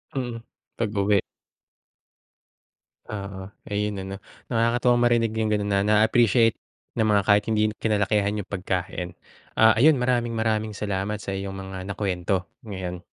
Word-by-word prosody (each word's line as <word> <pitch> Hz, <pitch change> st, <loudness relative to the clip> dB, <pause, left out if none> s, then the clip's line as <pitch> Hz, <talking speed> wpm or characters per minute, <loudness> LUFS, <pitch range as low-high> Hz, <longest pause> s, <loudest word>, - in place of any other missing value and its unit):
Mhm. 120 Hz, -3 st, -3 dB, 0.4 s
Pag-uwi. 105 Hz, -2 st, +2 dB, 1.9 s
Oo. 100 Hz, -2 st, -6 dB, 0.2 s
Ayun 105 Hz, 0 st, -1 dB
ano? 95 Hz, +1 st, -6 dB, 0.3 s
Nakakatuwang 120 Hz, +1 st, +2 dB
marinig 115 Hz, -2 st, +3 dB
yung 110 Hz, -1 st, 0 dB
gano'n 105 Hz, -1 st, 0 dB
na 100 Hz, -, +2 dB
na-appreciate 110 Hz, +2 st, +4 dB, 0.4 s
ng 110 Hz, -, +3 dB
mga 105 Hz, -2 st, +4 dB
kahit 105 Hz, 0 st, +5 dB
hindi 110 Hz, -1 st, +1 dB
kinalakihan 105 Hz, -1 st, +1 dB
yung 100 Hz, -, -13 dB
pagkain. 90 Hz, -2 st, -3 dB, 0.4 s
Ah, 110 Hz, 0 st, +5 dB
ayun 140 Hz, +2 st, +5 dB
maraming-maraming 115 Hz, -3 st, 0 dB
salamat 100 Hz, 0 st, -3 dB
sa -, -, -6 dB
iyong 95 Hz, 0 st, -4 dB
mga 95 Hz, -1 st, -7 dB
nakuwento 95 Hz, -2 st, -1 dB, 0.2 s
ngayon. 90 Hz, -4 st, -5 dB
105 Hz, 125 wpm, -25 LUFS, 95-115 Hz, 1.9 s, kahit